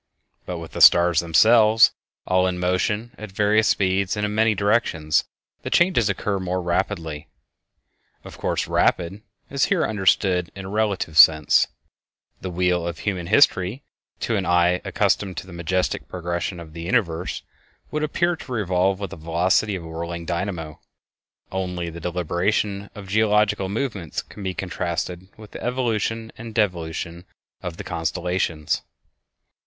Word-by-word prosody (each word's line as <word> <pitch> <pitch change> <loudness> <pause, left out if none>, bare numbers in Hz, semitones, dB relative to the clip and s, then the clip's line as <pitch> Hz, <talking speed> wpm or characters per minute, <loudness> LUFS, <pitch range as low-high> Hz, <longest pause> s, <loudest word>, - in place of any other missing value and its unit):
But 90 - -4
with 85 -1 -8
the - - -4
stars 85 -1 +7
themselves 110 +6 +5 0.3
all 95 0 +2
in 90 -1 -2
motion 105 +6 0
at 110 -2 -8
various 105 +2 +2
speeds 95 +1 +1
and 105 - 0
in 105 - -3
many 110 0 +3
directions, 100 -7 +1 0.4
the - - -5
changes 170 - +3
occur 100 0 -1
more 95 0 -2
rapidly. 80 -3 -2 1.0
Of - - -11
course, - - -1
"rapid" 90 +4 +1 0.3
is 140 -1 +2
here 195 -4 +1
understood 95 -3 +1
in 95 -1 -7
a - - -6
relative 100 -7 0
sense; 80 -1 +6 0.7
the 95 - -4
wheel 90 -1 0
of 85 - -4
human 90 -5 -3
history 110 0 +3 0.4
to 115 - 0
an 95 - -1
eye 90 +1 +3
accustomed 95 -4 0
to - - -5
the 95 - -12
majestic 85 +2 -1
progression 85 0 -4
of 80 -2 -11
the 85 - -7
universe 90 -3 -1 0.5
would 150 - -2
appear 175 +3 0
to 140 - -11
revolve 95 -3 +1
with 100 - -5
the 95 - -8
velocity 90 +6 +1
of 90 - -6
a - - -9
whirling 85 +1 -5
dynamo. 85 -3 -4 0.7
Only 90 -2 -3
the 85 - -8
deliberation 90 +4 -1
of 100 -2 -9
geological 105 -1 +2
movements 105 - -3
can - - -12
be 95 -1 -3
contrasted 90 0 -3
with 110 -1 -13
the - - -8
evolution 115 -2 -1
and 115 -1 -8
devolution 85 -4 -2 0.4
of 85 -2 -6
the - - -6
constellations. 85 -1 -2
95 Hz, 150 wpm, -23 LUFS, 85-105 Hz, 1.0 s, stars